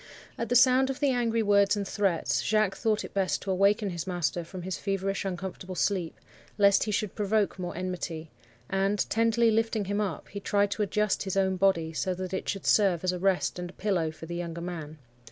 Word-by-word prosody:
At 230 - -4
the 245 - +1
sound 255 +2 +5
of 270 - -3
the 285 -2 +2
angry 230 -2 +1
words 200 0 +4
and 200 -1 -3
threats, 195 -6 0
Jacques 215 -2 +1
thought 215 -1 0
it - - -11
best 195 -2 0
to 195 - -2
awaken 200 +2 +2
his 170 0 -5
master 175 -1 -1
from 180 +2 -8
his 185 0 -4
feverish 195 0 -2
uncomfortable 185 0 -5
sleep, 180 -4 -1 0.4
lest 200 -1 +5
he 215 - -2
should 210 -1 -1
provoke 210 -1 0
more 175 -2 -5
enmity; 175 -3 -4 0.4
and, 195 +1 0
tenderly 230 +1 +3
lifting 225 -1 0
him 205 +2 -1
up, 205 - -3
he 200 - -6
tried 205 0 +1
to 215 - -2
adjust 210 0 0
his 190 0 -2
own 190 -1 +2
body, 175 -4 +1
so 185 +3 -1
that 185 0 -5
it 190 - -3
should 195 - -3
serve 190 -5 +3
as 185 - +2
a 180 - -4
rest 190 -1 +1
and 175 0 -5
a - - -12
pillow 185 -6 0
for 155 +1 -10
the 170 - -6
younger 170 -1 -4
man. 160 -3 -6
195 Hz, 215 wpm, -28 LUFS, 180-210 Hz, 0.4 s, sound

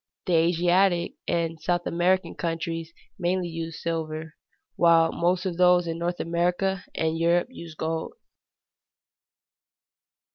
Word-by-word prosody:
The 180 - 0
Asiatic 175 +2 +3
and 165 -1 -1
South 175 +2 0
American 180 +2 +1
countries 165 -1 -3 0.3
mainly 180 0 0
use 165 -1 -5
silver, 160 -1 -3 0.4
while 165 -1 +5
most 180 +2 0
of 180 -3 -2
those 180 -1 +5
in 165 0 -4
North 175 +1 -2
America 180 +3 0
and 160 0 0
Europe 170 +5 +2
use 170 -9 -10
gold. 160 +1 -3
170 Hz, 115 wpm, -26 LUFS, 165-180 Hz, 0.4 s, while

